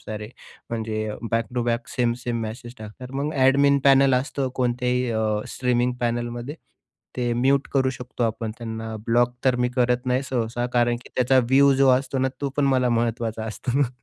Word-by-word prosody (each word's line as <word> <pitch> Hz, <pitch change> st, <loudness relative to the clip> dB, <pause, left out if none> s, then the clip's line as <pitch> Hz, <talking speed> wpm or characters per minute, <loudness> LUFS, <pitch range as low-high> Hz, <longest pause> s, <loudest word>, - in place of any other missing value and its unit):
सारे. 105 Hz, 0 st, -7 dB, 0.4 s
म्हणजे 110 Hz, -1 st, -3 dB, 0.2 s
back 115 Hz, 0 st, +1 dB
to 120 Hz, -, 0 dB
back 120 Hz, 0 st, -1 dB
same 120 Hz, -1 st, +2 dB
same 120 Hz, -1 st, -2 dB
message 120 Hz, +2 st, -7 dB
टाकतात. 110 Hz, +4 st, -10 dB
मग 145 Hz, +3 st, -2 dB
एडमिन 140 Hz, +1 st, +4 dB
पॅनल 135 Hz, -1 st, +6 dB
असतो 135 Hz, +1 st, -1 dB
कोणत्याही 125 Hz, 0 st, 0 dB
अ, 110 Hz, -1 st, -1 dB, 0.4 s
स्ट्रीमिंग 125 Hz, -1 st, +1 dB
पॅनेलमध्ये. 120 Hz, +2 st, -2 dB, 0.6 s
ते 120 Hz, -1 st, 0 dB
म्यूट 135 Hz, +3 st, +2 dB
करू 130 Hz, -1 st, +2 dB
शकतो 125 Hz, -1 st, -6 dB
आपण 115 Hz, 0 st, -2 dB
त्यांना. 110 Hz, -1 st, -5 dB
ब्लॉक 120 Hz, +1 st, +2 dB
तर 130 Hz, -2 st, +3 dB
मी 125 Hz, -, +2 dB
करत 125 Hz, 0 st, +1 dB
नाही 125 Hz, +1 st, +1 dB
सहसा 120 Hz, -1 st, -1 dB
कारण 120 Hz, 0 st, +3 dB
की -, -, -14 dB
त्याचा 130 Hz, +1 st, +3 dB
व्ह्यू 140 Hz, +1 st, +6 dB
जो 135 Hz, 0 st, +4 dB
असतो 135 Hz, 0 st, -4 dB
ना 130 Hz, 0 st, +2 dB
तो 140 Hz, -, -1 dB
पण 145 Hz, -, +2 dB
मला 130 Hz, -2 st, +2 dB
महत्त्वाचा 115 Hz, -1 st, -1 dB
असतो 125 Hz, +4 st, -2 dB
ना. 140 Hz, -, +3 dB
125 Hz, 180 wpm, -24 LUFS, 115-130 Hz, 0.6 s, पॅनल